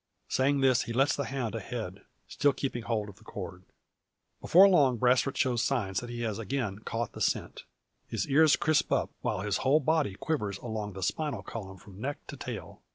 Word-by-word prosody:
Saying 135 +2 +2
this, 130 -2 +4
he 115 - -4
lets 135 +4 +3
the 140 - -2
hound 125 -4 -3
ahead, 105 -3 -5 0.3
still 145 -1 +2
keeping 130 -3 -3
hold 110 -2 -2
of 100 -1 -11
the 110 - -19
cord. 95 -4 -7 0.8
Before 190 +4 +7
long, 140 -10 +4
Brasfort 125 +3 +2
shows 125 -3 +2
signs 105 -8 0
that 120 - -8
he 120 0 -5
has 110 -2 -2
again 115 -4 -2
caught 115 +1 -3
scent. - - -1 0.4
His 110 -4 -2
ears 150 +1 +5
crisp 155 -1 +1
up, - - +1
while 95 - -1
his 105 0 0
whole 140 +4 +3
body 155 -8 +1
quivers 105 -8 -2
along 110 -3 -5
the 95 0 -6
spinal 140 - -2
column 95 -2 -7
from 100 +1 -13
neck 140 +4 -4
to - - -6
tail. - - -7
120 Hz, 190 wpm, -29 LUFS, 105-140 Hz, 0.8 s, Before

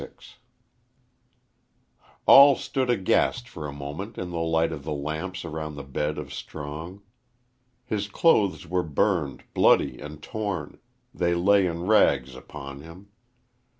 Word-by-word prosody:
XXXVI - - -13 1.9
ALL 140 0 +9
stood 130 -2 -2
aghast 120 +2 +1
for 75 -8 -7
a - - -6
moment 70 +10 -7
in 90 -1 -5
the 85 - -3
light 80 0 +1
of 75 -3 -6
the 75 +1 -3
lamps 80 +6 -4
around 80 -2 -5
the 70 - -7
bed 75 +2 -3
of - - -7
Strong. 80 +6 -8 0.8
His 105 -1 -2
clothes 100 - +2
were 90 +2 0
burned, 80 -1 -1
bloody, - - +3
and 75 0 -9
torn 100 -8 -4 0.3
they 85 0 0
lay 95 +2 +4
in 85 0 -4
rags 105 0 +3
upon 70 -2 -9
him. 85 +6 -13
85 Hz, 135 wpm, -25 LUFS, 75-100 Hz, 1.9 s, ALL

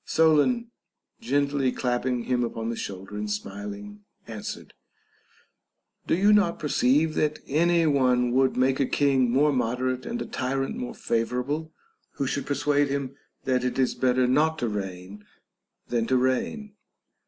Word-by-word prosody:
Solon, 160 +10 +2 0.5
gently 140 - +1
clapping 125 -1 -1
him 125 0 0
upon 115 -1 -3
the - - -4
shoulder 95 -1 -7
and 105 0 -3
smiling, 105 0 -6 0.2
answered: - - -7 1.3
Do - - +3
you 205 +3 +5
not 200 -5 +3
per 150 - -4
ceive 145 +6 +3
that 150 0 0
any 170 +3 +2
one 125 -4 +2
would 130 +1 +2
make 130 +1 +2
a 135 - +2
king 135 -3 +2
more 145 +4 +3
moderate 125 +1 -1
and 235 +1 -3
a - - -3
tyrant 135 +1 -2
more 125 - -5
favorable, 125 +7 -2 0.4
who 140 - -2
should 140 +1 -2
persuade 145 0 +1
him 140 -1 -3 0.3
that 130 -1 +1
it 125 - -2
is 130 -1 +2
better 130 0 +2
not 150 +5 +2
to 120 - -1
reign 95 0 -6 0.7
than 115 -2 0
to 130 - +3
reign? 130 - -1
130 Hz, 150 wpm, -26 LUFS, 120-145 Hz, 1.3 s, you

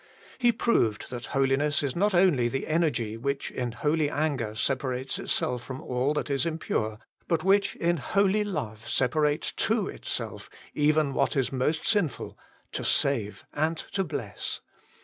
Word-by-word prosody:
He 240 -1 +5
proved 125 - +1
that 120 -1 -5
holiness 135 +2 +2
is 140 -3 -1
not 200 +2 +2
only 175 -10 +4
the 135 +3 -2
energy 150 -9 0
which 140 +4 -2
in 125 -2 -2
holy 150 +5 +1
anger 140 -9 -1
separates 130 +1 -1
itself 125 -1 0
from 130 0 -6
all 130 +4 0
that 150 - -2
is 140 - +1
impure, 155 -10 -1 0.3
but 165 -2 +1
which 200 +1 +3
in 170 0 +1
holy 200 +5 +2
love 115 - -4
separates 150 +3 +1
to - - 0
itself - - -5 0.2
even 150 -1 +2
what - - +1
is 135 -3 +1
most 145 +5 0
sinful, 205 -10 0 0.4
to - - -3
save 115 -7 +1
and 160 +2 0
to 195 - +1
bless. 140 - -4
145 Hz, 150 wpm, -28 LUFS, 125-165 Hz, 0.4 s, He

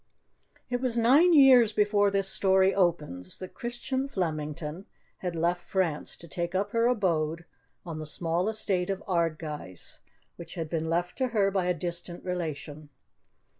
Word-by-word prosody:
It 245 0 -1
was 250 -3 -1
nine 275 +10 +5
years 260 -7 +7
before 205 -1 +3
this 195 -1 0
story 190 0 +3
opens 150 - -1
that 185 - -8
Christian 260 +3 -3
Flemington 155 - -4 0.3
had 180 -2 -3
left 170 +2 0
France 175 -5 -2
to 170 - -13
take 170 +3 -4
up 195 +2 0
her 230 -1 +2
abode 170 -8 0 0.4
on 165 -3 -5
the 155 - -5
small 170 +5 -1
estate 195 -4 -1
of 195 0 -3
Ardguys, 155 - -3 0.4
which 170 - -10
had 165 -3 -4
been 160 -1 -1
left 175 +5 -1
to 260 - +2
her 205 -5 +2
by 190 -2 0
a 180 - +1
distant 175 +1 -6
relation. 155 -4 -5
180 Hz, 155 wpm, -28 LUFS, 165-205 Hz, 0.4 s, years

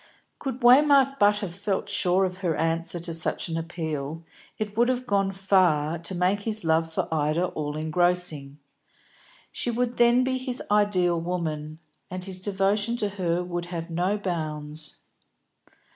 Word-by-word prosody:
Could 265 -1 -5
Waymark 275 +2 +5
but 205 0 +5
have 185 -5 -4
felt 200 +1 -2
sure 190 -2 +2
of 185 0 -5
her 175 -4 -1
answer 165 +2 -1
to 170 0 -3
such 165 +1 +2
an 165 - -3
appeal, 160 -2 -4 0.3
it 210 -1 -4
would 240 +2 +3
have 255 0 -1
gone 195 -4 +1
far 180 -5 +2
to 170 +3 -3
make 180 +3 +1
his 215 0 -1
love 160 0 +1
for - - -2
Ida 155 +3 +1
all 150 -1 -4
engrossing. 160 -3 0 0.9
She - - -3
would 245 +1 -1
then 240 +1 +5
be 260 0 -1
his 255 -1 -1
ideal 185 -5 +2
woman, 155 -3 -3 0.3
and 185 0 -6
his 185 -1 -6
devotion 205 +4 0
to 210 -3 -1
her 180 -3 -1
would 175 -1 -4
have 170 -1 -6
no 180 +5 0
bounds. 155 -5 -4
180 Hz, 160 wpm, -26 LUFS, 165-205 Hz, 0.9 s, Waymark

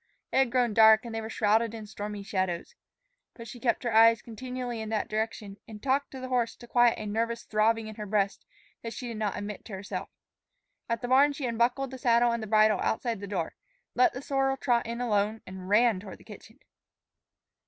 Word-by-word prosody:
It - - 0
had 265 -3 +3
grown 245 -3 +2
dark 220 +1 +6
and 235 - -6
they 225 - -3
were 220 - -6
shrouded 225 +1 +1
in 220 -1 -7
stormy 205 0 -6
shadows. 185 -3 -2 0.6
But 230 -1 -10
she 240 +2 -9
kept 235 +1 0
her 235 -2 -1
eyes 225 0 +6
continually 245 0 -5
in 220 - -5
that 220 -1 -1
direction, 215 -2 -4
and 215 -2 -9
talked 275 +3 0
to 265 - -9
the 255 0 -6
horse 245 -2 0
to 240 - -14
quiet 240 -1 +4
a 215 - -6
nervous 230 +2 -2
throbbing 220 +1 +1
in 215 - -7
her 210 -1 -6
breast 200 -1 0 0.4
that 230 0 -6
she 245 - -6
did 230 - -6
not 210 -2 -2
admit 205 0 -6
to 215 - -10
herself. 190 +1 -5 0.8
At 230 0 -2
the - - -1
barn 275 +3 +5
she 280 -1 -5
unbuckled 245 +3 0
the 260 - -8
saddle 240 0 +3
and 235 -1 -2
the 220 - -5
bridle 215 -1 +4
outside 230 -1 -1
the 200 - -7
door, 185 -5 -3 0.4
let 370 -4 +4
the 255 - -7
sorrel 270 -1 0
trot 240 -4 +1
in 235 +1 -4
alone, 215 -2 0
and 185 0 -9
ran 220 -1 +4
toward 190 0 -10
the - - -19
kitchen. - - -13
225 Hz, 215 wpm, -28 LUFS, 210-245 Hz, 0.8 s, dark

